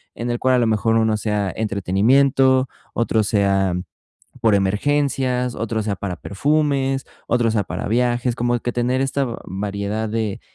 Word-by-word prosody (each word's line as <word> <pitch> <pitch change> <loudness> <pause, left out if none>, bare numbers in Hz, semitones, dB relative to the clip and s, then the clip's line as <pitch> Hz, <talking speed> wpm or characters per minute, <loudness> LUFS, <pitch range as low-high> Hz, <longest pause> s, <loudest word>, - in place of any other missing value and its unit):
en 120 +1 -4
el 120 - -2
cual, 130 0 +3
a - - +3
lo 120 - +2
mejor, 110 +1 +1
uno 110 -1 +2
sea 105 -2 -1
entretenimiento, 130 +6 +2 0.2
otro 115 -1 +1
sea, 100 -3 +1 0.7
por 110 -2 +4
emergencias, 125 +4 0
otro 110 0 -2
sea, 105 -2 -2
para 95 -1 -4
perfumes, 135 - 0 0.2
otro 120 -1 +2
sea 110 -2 0
para - - -4
viajes, 120 +1 +1
como 120 0 +1
que 120 - -3
tener, 125 +2 0
esta 135 0 0 0.2
variedad 100 +3 -3
de 110 -1 -2
115 Hz, 155 wpm, -21 LUFS, 105-130 Hz, 0.7 s, por